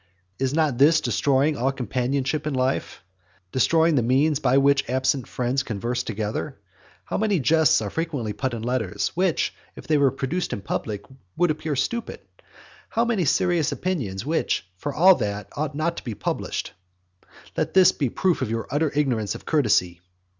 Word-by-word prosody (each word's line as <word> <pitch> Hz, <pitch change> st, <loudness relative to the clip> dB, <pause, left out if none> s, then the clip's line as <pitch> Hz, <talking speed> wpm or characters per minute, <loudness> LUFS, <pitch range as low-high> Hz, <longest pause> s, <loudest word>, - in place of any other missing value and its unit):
Is 135 Hz, +1 st, 0 dB
not 155 Hz, -6 st, +1 dB
this 155 Hz, +3 st, +6 dB
destroying 140 Hz, +1 st, +1 dB
all 135 Hz, 0 st, 0 dB
companionship 135 Hz, +4 st, -2 dB
in 145 Hz, -, -1 dB
life, 130 Hz, -5 st, -1 dB, 0.5 s
destroying 165 Hz, +5 st, +3 dB
the 135 Hz, -, +3 dB
means 135 Hz, +5 st, +2 dB
by 135 Hz, -2 st, +3 dB
which 140 Hz, -1 st, +3 dB
absent 130 Hz, 0 st, 0 dB
friends 125 Hz, +2 st, -1 dB
converse 120 Hz, +2 st, -3 dB
together? 110 Hz, +5 st, -4 dB, 0.5 s
How -, -, -2 dB
many 205 Hz, -4 st, +1 dB
jests 155 Hz, -4 st, +3 dB
are 100 Hz, -, -4 dB
frequently 145 Hz, -10 st, -3 dB
put 130 Hz, +3 st, -2 dB
in 110 Hz, -, -6 dB
letters, 110 Hz, -5 st, -1 dB
which, 180 Hz, -2 st, 0 dB, 0.2 s
if -, -, -11 dB
they 155 Hz, -2 st, +2 dB
were 140 Hz, -1 st, +5 dB
produced 140 Hz, +8 st, -3 dB
in 100 Hz, -, -5 dB
public, 105 Hz, 0 st, -3 dB, 0.3 s
would 175 Hz, -1 st, +3 dB
appear 155 Hz, -1 st, -3 dB
stupid! 235 Hz, -, -3 dB, 0.7 s
How 230 Hz, -, +1 dB
many 220 Hz, -7 st, 0 dB
serious 165 Hz, +1 st, +2 dB
opinions, 120 Hz, -, -3 dB
which, 160 Hz, -, 0 dB
for 145 Hz, +10 st, -4 dB
all 180 Hz, +7 st, +6 dB
that, 100 Hz, -1 st, -3 dB
ought 145 Hz, 0 st, -3 dB
not 170 Hz, +3 st, -1 dB
to -, -, -6 dB
be 115 Hz, -4 st, -5 dB
published! -, -, -3 dB, 0.8 s
Let -, -, -2 dB
this 185 Hz, -2 st, +7 dB
be 140 Hz, -, -1 dB
a -, -, -3 dB
proof 180 Hz, +7 st, 0 dB
of -, -, -1 dB
your 115 Hz, 0 st, -2 dB
utter 145 Hz, +2 st, +1 dB
ignorance 120 Hz, -9 st, 0 dB
of -, -, -10 dB
courtesy. 100 Hz, -, +1 dB
135 Hz, 175 wpm, -24 LUFS, 120-155 Hz, 0.8 s, this